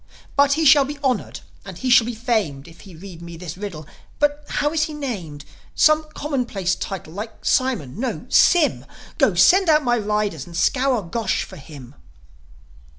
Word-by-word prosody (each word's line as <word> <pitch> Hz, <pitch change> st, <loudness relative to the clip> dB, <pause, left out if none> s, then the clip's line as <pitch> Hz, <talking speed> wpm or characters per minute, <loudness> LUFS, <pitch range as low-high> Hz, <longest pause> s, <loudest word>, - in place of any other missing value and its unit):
But 280 Hz, 0 st, +4 dB
he 320 Hz, +2 st, 0 dB
shall 285 Hz, 0 st, +7 dB
be 290 Hz, +2 st, -6 dB
honoured, 255 Hz, -5 st, -1 dB, 0.2 s
and 190 Hz, -3 st, -10 dB
he 255 Hz, +6 st, -2 dB
shall 240 Hz, -2 st, +6 dB
be 240 Hz, -, -4 dB
famed 215 Hz, -, -2 dB
If 165 Hz, 0 st, -16 dB
he 190 Hz, -4 st, -14 dB
read 175 Hz, 0 st, -11 dB
me 170 Hz, -1 st, -9 dB
this 170 Hz, -2 st, -7 dB
riddle. 185 Hz, -6 st, -7 dB, 0.3 s
But 295 Hz, 0 st, 0 dB
how 295 Hz, +1 st, -1 dB
is 310 Hz, -1 st, +1 dB
he 310 Hz, -, -7 dB
named? 185 Hz, -, -6 dB, 0.3 s
Some 310 Hz, 0 st, +3 dB
commonplace 240 Hz, -, -2 dB
title, 185 Hz, -5 st, -6 dB
like 215 Hz, +3 st, -8 dB
Simon? 225 Hz, -, 0 dB
No 260 Hz, -, -3 dB
Sym! 340 Hz, -5 st, +3 dB, 0.3 s
Go, -, -, +3 dB
send 380 Hz, -1 st, +5 dB
out 305 Hz, -1 st, +4 dB
my 240 Hz, -2 st, +1 dB
riders, 210 Hz, -8 st, -2 dB
and 170 Hz, -1 st, -8 dB
scour 255 Hz, +4 st, +1 dB
Gosh 190 Hz, +3 st, -2 dB
for 190 Hz, -, -12 dB
him." 140 Hz, -3 st, -12 dB
220 Hz, 175 wpm, -21 LUFS, 175-280 Hz, 0.3 s, shall